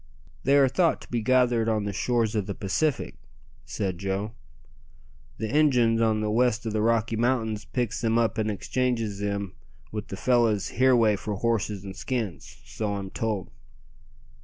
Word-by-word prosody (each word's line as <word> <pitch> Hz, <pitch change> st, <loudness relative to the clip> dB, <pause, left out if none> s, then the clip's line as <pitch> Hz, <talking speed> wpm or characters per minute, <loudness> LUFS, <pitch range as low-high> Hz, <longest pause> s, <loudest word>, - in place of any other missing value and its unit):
"They 140 Hz, +2 st, +4 dB
are 140 Hz, -1 st, +6 dB
thought 165 Hz, +6 st, +2 dB
to -, -, -14 dB
be 120 Hz, -1 st, 0 dB
gathered 120 Hz, -1 st, +3 dB
on 110 Hz, -2 st, +1 dB
the 100 Hz, -1 st, -3 dB
shores 115 Hz, +2 st, 0 dB
o' 105 Hz, -, +2 dB
the 100 Hz, 0 st, -5 dB
Pacific," 135 Hz, +9 st, -1 dB, 0.5 s
said 95 Hz, -4 st, -3 dB
Joe. 100 Hz, +2 st, -2 dB, 1.1 s
"The 110 Hz, -, -3 dB
Injuns 125 Hz, -7 st, +4 dB
on 110 Hz, -1 st, +2 dB
the 105 Hz, 0 st, -1 dB
west 120 Hz, 0 st, +2 dB
o' 110 Hz, -, -1 dB
the 105 Hz, 0 st, 0 dB
Rocky 115 Hz, 0 st, +1 dB
Mountains 110 Hz, -2 st, 0 dB
picks 120 Hz, -2 st, -2 dB
them 115 Hz, 0 st, +2 dB
up 115 Hz, -1 st, +1 dB
and 110 Hz, 0 st, 0 dB
exchanges 115 Hz, -1 st, -1 dB
them 100 Hz, -2 st, -3 dB, 0.4 s
wi' 105 Hz, -, -3 dB
the 95 Hz, -, -6 dB
fellows 115 Hz, -4 st, +2 dB
hereaway 120 Hz, -4 st, +4 dB
for 105 Hz, +1 st, -4 dB
horses 105 Hz, -2 st, -1 dB
and 95 Hz, -1 st, -7 dB
skins 105 Hz, -, -4 dB
so 105 Hz, -2 st, -3 dB
I'm 95 Hz, -1 st, -5 dB
told." 110 Hz, -4 st, -3 dB
110 Hz, 165 wpm, -26 LUFS, 105-120 Hz, 1.1 s, are